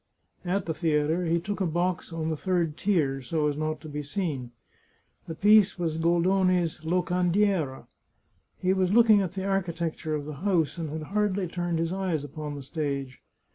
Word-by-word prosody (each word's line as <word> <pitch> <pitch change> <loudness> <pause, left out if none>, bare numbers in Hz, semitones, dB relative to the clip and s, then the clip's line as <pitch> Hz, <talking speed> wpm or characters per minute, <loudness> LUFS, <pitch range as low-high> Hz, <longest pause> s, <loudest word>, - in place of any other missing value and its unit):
At 185 +1 -1
the 160 - -1
theatre 160 +1 +1
he 170 +1 +2
took 200 +4 -4
a 185 - +2
box 175 +2 -1
on 160 -1 -2
the - - 0
third 170 -2 0
tier, 155 -9 +1
so 150 +4 0
as 145 - -1
not 155 0 -2
to 155 - -9
be 150 0 -4
seen. 145 -5 -3 0.8
The 165 - -5
piece 205 +1 +5
was 165 -2 -2
Goldoni's 175 0 +2
" - - -22
Locandiera." 180 -2 +1 0.7
He 185 0 +1
was 190 -1 +1
looking 220 -2 +6
at 185 -2 -3
the 190 0 -4
architecture 170 -5 -1
of 145 -1 -4
the 150 -1 -7
house, 180 -4 +1
and 160 -2 -3
had 155 +4 -6
hardly 200 -3 +1
turned 175 0 -2
his 165 +2 -1
eyes 185 -6 -1
upon 145 +1 -6
the 140 - -7
stage. 140 -3 -4
170 Hz, 180 wpm, -27 LUFS, 155-185 Hz, 0.8 s, looking